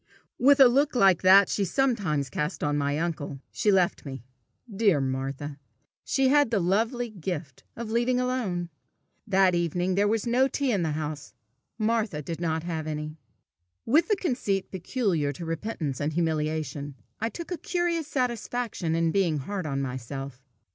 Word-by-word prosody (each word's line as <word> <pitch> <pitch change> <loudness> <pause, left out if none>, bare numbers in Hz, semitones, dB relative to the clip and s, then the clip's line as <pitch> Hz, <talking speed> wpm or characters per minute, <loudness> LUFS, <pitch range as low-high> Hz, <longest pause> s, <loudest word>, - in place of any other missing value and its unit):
With 280 +2 +5
a 270 - +10
look 275 +4 +3
like 195 -7 +5
that 190 +1 +7
she 205 - 0
sometimes 190 - 0
cast 150 +4 -3
on 145 0 +1
my 145 0 0
uncle, 155 -4 -3
she 210 - +1
left 185 -3 +2
me. 135 -4 -7 0.4
Dear 200 -7 +2
Martha! 135 +2 -3 0.4
she 270 -1 +2
had 290 -2 +4
the 220 -3 +1
lovely 225 +6 0
gift 165 - -5
of 230 -1 -6
leaving 240 +2 +2
alone. 215 -10 -2 0.6
That 190 -2 +4
evening 175 +2 0
there 200 +2 +2
was 220 +1 0
no 250 +3 +3
tea 275 -1 -1
in 200 -5 +1
the 160 -2 -1
house; 150 -3 -5 0.4
Martha 215 -8 0
did 165 +3 -5
not 160 -1 -1
have 160 -3 -4
any. 155 0 -5 0.7
With 300 +9 +4
the 420 - +3
conceit 245 - -1
peculiar 185 - -1
to 170 - -7
repentance 165 - -3
and 150 +2 -1
humiliation, 155 -3 -2 0.2
I 225 - -1
took 340 +7 -8
a 355 - -1
curious 345 -2 -1
satisfaction 240 - -2
in 165 0 +2
being 175 -5 +1
hard 185 +4 -4
on 140 -1 -1
myself. 130 +1 -6
180 Hz, 160 wpm, -27 LUFS, 150-235 Hz, 0.7 s, a